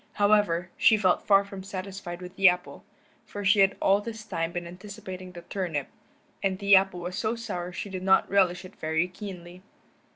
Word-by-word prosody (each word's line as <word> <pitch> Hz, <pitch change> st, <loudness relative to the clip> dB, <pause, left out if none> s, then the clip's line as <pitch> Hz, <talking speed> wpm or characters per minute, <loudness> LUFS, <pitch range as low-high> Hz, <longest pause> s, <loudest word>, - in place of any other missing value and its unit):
However, 205 Hz, -4 st, +2 dB
she 220 Hz, -, +5 dB
felt 185 Hz, -4 st, +2 dB
far 200 Hz, -1 st, +5 dB
from 195 Hz, -1 st, -8 dB
satisfied 190 Hz, -2 st, -7 dB
with 180 Hz, 0 st, -10 dB
the 195 Hz, -1 st, +7 dB
apple, 180 Hz, 0 st, -4 dB, 0.4 s
for 205 Hz, -1 st, -7 dB
she 205 Hz, +2 st, +5 dB
had 195 Hz, 0 st, +4 dB
all 200 Hz, +1 st, +3 dB
this 220 Hz, 0 st, -7 dB
time 165 Hz, -5 st, -2 dB
been 175 Hz, 0 st, -4 dB
anticipating 185 Hz, 0 st, -9 dB
the 175 Hz, -1 st, -10 dB
turnip, 170 Hz, -8 st, -3 dB, 0.5 s
and 190 Hz, -1 st, 0 dB
the 200 Hz, 0 st, +5 dB
apple 190 Hz, -2 st, +2 dB
was 180 Hz, +1 st, -5 dB
so 220 Hz, +3 st, -1 dB
sour 180 Hz, -6 st, -5 dB
she 195 Hz, +2 st, -6 dB
did 185 Hz, -1 st, -5 dB
not 190 Hz, 0 st, +4 dB
relish 185 Hz, -2 st, +2 dB
it 185 Hz, -, -13 dB
very 160 Hz, +2 st, 0 dB
keenly. 180 Hz, -2 st, -9 dB
190 Hz, 190 wpm, -27 LUFS, 180-200 Hz, 0.5 s, the